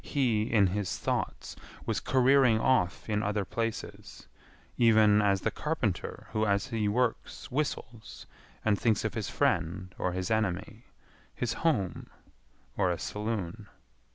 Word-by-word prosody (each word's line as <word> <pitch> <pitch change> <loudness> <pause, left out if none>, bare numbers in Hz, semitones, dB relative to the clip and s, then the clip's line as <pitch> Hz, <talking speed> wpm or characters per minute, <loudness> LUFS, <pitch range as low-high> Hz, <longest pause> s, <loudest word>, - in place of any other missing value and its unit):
He, 115 -6 0
in 105 -4 +5
his 95 +1 -1
thoughts, - - -3 0.3
was - - 0
careering 130 -3 +4
off 110 -8 +1
in 105 -1 0
other 105 -1 -1
places, 115 +2 -5 0.5
even 110 -3 +5
as 100 -2 +2
the - - 0
carpenter - - -3
who 110 - 0
as 100 -2 +1
he 110 -2 0
works 115 +3 -1
whistles 115 - -4 0.4
and 105 -2 +2
thinks 115 -3 +2
of - - -1
his - - -3
friend 85 +3 0
or 90 - -1
his 95 +3 -3
enemy, 110 +1 -1 0.5
his 120 -2 -1
home 120 - 0 0.7
or 90 - +2
a 85 - 0
saloon. 105 0 -4
105 Hz, 135 wpm, -29 LUFS, 100-115 Hz, 0.7 s, in